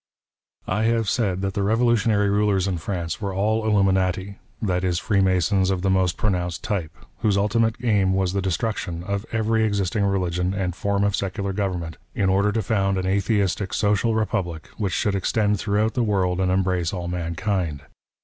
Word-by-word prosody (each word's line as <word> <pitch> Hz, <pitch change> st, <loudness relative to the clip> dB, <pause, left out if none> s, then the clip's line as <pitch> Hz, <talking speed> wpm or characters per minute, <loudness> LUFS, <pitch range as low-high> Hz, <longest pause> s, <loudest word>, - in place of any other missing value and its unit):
I 105 Hz, +4 st, 0 dB
have 115 Hz, -1 st, +1 dB
said 95 Hz, -4 st, 0 dB
that 95 Hz, 0 st, -1 dB
the 100 Hz, -, -1 dB
revolutionary 110 Hz, -1 st, +2 dB
rulers 100 Hz, -2 st, +2 dB
in 90 Hz, -3 st, -1 dB
France 85 Hz, +1 st, -4 dB
were 100 Hz, -2 st, -3 dB
all 110 Hz, +3 st, +1 dB
Hluminati 95 Hz, -2 st, +1 dB
— -, -, -35 dB
that 90 Hz, 0 st, 0 dB
is 90 Hz, -2 st, +1 dB
Freemasons 95 Hz, -2 st, +2 dB
of 95 Hz, -1 st, -1 dB
the 95 Hz, -, +2 dB
most 95 Hz, -2 st, +1 dB
pronounced 90 Hz, -4 st, -1 dB
type 100 Hz, -8 st, -2 dB, 0.2 s
— -, -, -36 dB
whose 105 Hz, -2 st, +2 dB
ultimate 110 Hz, +2 st, +2 dB
aim 100 Hz, -5 st, +3 dB
was 95 Hz, -1 st, 0 dB
the 100 Hz, -, 0 dB
destruction 95 Hz, -2 st, -2 dB
of 100 Hz, +2 st, -3 dB
every 110 Hz, 0 st, +1 dB
existing 100 Hz, -1 st, 0 dB
religion 90 Hz, -1 st, 0 dB
and 90 Hz, -3 st, -2 dB
form 100 Hz, +2 st, 0 dB
of 100 Hz, 0 st, +2 dB
secular 100 Hz, 0 st, -3 dB
government, 90 Hz, -5 st, -3 dB, 0.2 s
in 95 Hz, -2 st, +1 dB
order 100 Hz, +2 st, +3 dB
to 110 Hz, 0 st, -1 dB
found 95 Hz, -1 st, +1 dB
an 95 Hz, -, -1 dB
atheistic, 100 Hz, 0 st, 0 dB
social 105 Hz, +2 st, +1 dB
republic, 90 Hz, -7 st, -2 dB
which 100 Hz, -4 st, -1 dB
should 105 Hz, -, +1 dB
extend 105 Hz, +1 st, +1 dB
throughout 105 Hz, +2 st, 0 dB
the 125 Hz, -, 0 dB
world 95 Hz, -5 st, +1 dB
and 95 Hz, -1 st, +1 dB
embrace 90 Hz, -3 st, 0 dB
all 90 Hz, -2 st, -4 dB
mankind. 85 Hz, -2 st, -2 dB
100 Hz, 180 wpm, -23 LUFS, 90-105 Hz, 0.2 s, aim